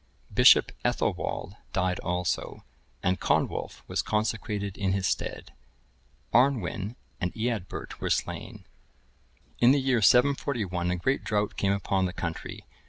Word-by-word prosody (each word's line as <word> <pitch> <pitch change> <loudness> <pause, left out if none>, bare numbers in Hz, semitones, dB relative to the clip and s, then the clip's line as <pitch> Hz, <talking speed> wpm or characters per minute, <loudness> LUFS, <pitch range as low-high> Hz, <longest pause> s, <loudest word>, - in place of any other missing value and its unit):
Bishop - - +7
Ethelwald 95 - -1 0.2
died 90 -1 0
also, 90 -1 -2 0.4
and 90 +1 +1
Conwulf,(1067) - - 0
was - - 0
consecrated 105 -2 -2
in 95 -2 0
his 95 -1 0
stead. - - -3 0.8
Arnwin(1068) 120 -4 +2 0.3
and 90 - -1
Eadbert(1069) 110 -4 -3
were - - -1
slain. - - -3 0.9
In 120 - +6
the 140 +2 +5
year 130 -3 +2
741, 115 -7 +2
a 90 - +1
great 130 +10 0
drought 105 -1 -1
came 100 - +1
upon 100 -1 0
the 90 - -3
country. 85 -3 -5
100 Hz, 125 wpm, -28 LUFS, 90-120 Hz, 0.9 s, Bishop